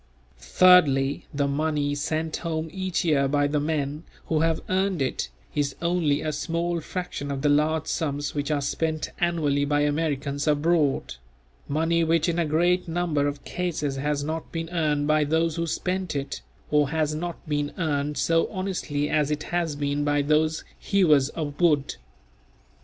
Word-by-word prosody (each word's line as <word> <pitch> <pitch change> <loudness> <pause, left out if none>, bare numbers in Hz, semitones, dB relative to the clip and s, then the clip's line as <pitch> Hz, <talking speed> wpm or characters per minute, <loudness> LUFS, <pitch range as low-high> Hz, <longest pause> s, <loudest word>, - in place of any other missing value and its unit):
Thirdly, 140 - +4
the 140 -1 0
money 145 0 0
sent 155 +2 -2
home 160 -1 -3
each 185 -1 -2
year 140 -4 +3
by 145 +1 +2
the 145 +1 +1
men 150 -1 -2 0.2
who 160 - 0
have 165 0 +1
earned 190 -1 0
it, 130 - -1 0.2
is 145 -2 -1
only 170 -4 +1
a 155 - -1
small 170 +2 -1
fraction 175 -4 -5
of 140 0 -3
the 145 - +3
large 150 +1 +2
sums 145 -2 -2
which 145 0 -2
are 145 -2 0
spent 155 +2 -2
annually 155 -5 +1
by 145 +1 +1
Americans 145 -1 -1
abroad; 150 - +1 0.5
money 165 +3 +1
which 165 0 +2
in 170 0 0
a 165 - +1
great 175 +4 +2
number 165 -4 0
of 145 0 -4
cases 155 -6 -2
has 145 +1 -1
not 160 +2 -4
been 165 0 -4
earned 150 -4 +1
by 155 0 +3
those 160 +2 +1
who 170 0 -1
spent 180 0 -2
it, 140 0 -4 0.3
or 150 -2 +3
has 155 -1 0
not 170 +2 -5
been 145 -1 -1
earned 150 -4 -1
so 165 0 +2
honestly 185 -7 -2
as 150 -1 +1
it 150 0 -2
has 170 -3 -1
been 145 0 -1
by 145 0 +1
those 155 +2 +1 0.2
"hewers 155 -9 +3
of 150 -1 -5
wood." 150 - +2
155 Hz, 165 wpm, -25 LUFS, 145-165 Hz, 0.5 s, Thirdly